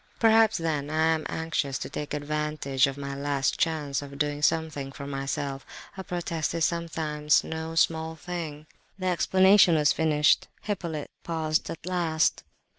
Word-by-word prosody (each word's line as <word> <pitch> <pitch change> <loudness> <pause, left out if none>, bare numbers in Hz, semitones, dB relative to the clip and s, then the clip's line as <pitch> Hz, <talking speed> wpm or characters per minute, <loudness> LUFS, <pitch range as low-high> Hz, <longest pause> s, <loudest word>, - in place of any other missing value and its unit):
"Perhaps 225 -1 +5
then 155 -4 -2
I 160 +1 +2
am 160 -1 -3
anxious 155 -4 -2
to - - -5
take 150 0 -5
advantage 150 -2 0
of 135 0 -5
my 140 -1 -5
last 140 -1 -1
chance 150 -4 0
of 140 -1 -9
doing 145 0 -1
something 150 -3 0
for 140 +1 -8
myself. 135 0 -3 0.3
A 190 - -6
protest 170 -3 -3
is 165 - +2
sometimes 155 -3 0
no 160 0 -5
small 160 0 +1
thing." 160 -3 -6 0.3
The 185 - -5
explanation 185 0 +5
was 150 -1 +4
finished; 150 -2 +3 0.2
Hippolyte 170 -8 -4
paused 160 -2 -1
at 165 - -7
last. 170 -3 +1
155 Hz, 150 wpm, -27 LUFS, 145-165 Hz, 0.3 s, Perhaps